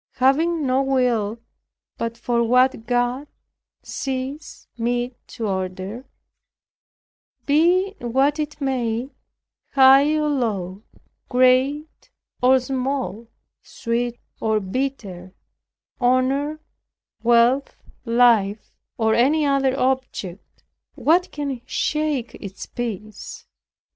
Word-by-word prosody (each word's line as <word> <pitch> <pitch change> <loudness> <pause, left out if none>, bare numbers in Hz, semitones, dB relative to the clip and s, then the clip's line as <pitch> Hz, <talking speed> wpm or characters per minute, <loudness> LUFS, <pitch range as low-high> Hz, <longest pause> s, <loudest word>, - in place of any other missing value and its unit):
Having 305 +5 +2
no 260 +1 +2
will 245 -5 +1 0.6
but 230 0 -4
for 235 0 0
what 250 -1 +2
God 245 +3 0 0.6
sees 270 +3 -5
meet 240 +1 -2
to 225 - -5
order, 190 +5 -4 1.4
be 345 +6 +3
it - - -16
what 270 +5 +1
it 300 0 -4
may, 255 -2 -2 0.6
high 275 +3 +6
or 305 -1 +1
low, 205 -9 -2 0.5
great 260 +4 +2 0.3
or 260 +1 +5
small, 255 -3 -3 0.3
sweet 235 +1 -3 0.2
or 220 -1 +1
bitter, 195 -4 -4 0.6
honor, 265 +4 +1 0.6
wealth, 240 +3 +3 0.3
life, 230 -4 +2 0.2
or 220 -1 +2
any 290 +7 +3
other 275 -1 +1
object, 255 -8 -3 0.3
what 355 +4 +2
can 280 -4 -4
shake 300 -7 -1
its 195 -2 -8
peace? 215 -3 -7
255 Hz, 95 wpm, -22 LUFS, 230-275 Hz, 1.4 s, high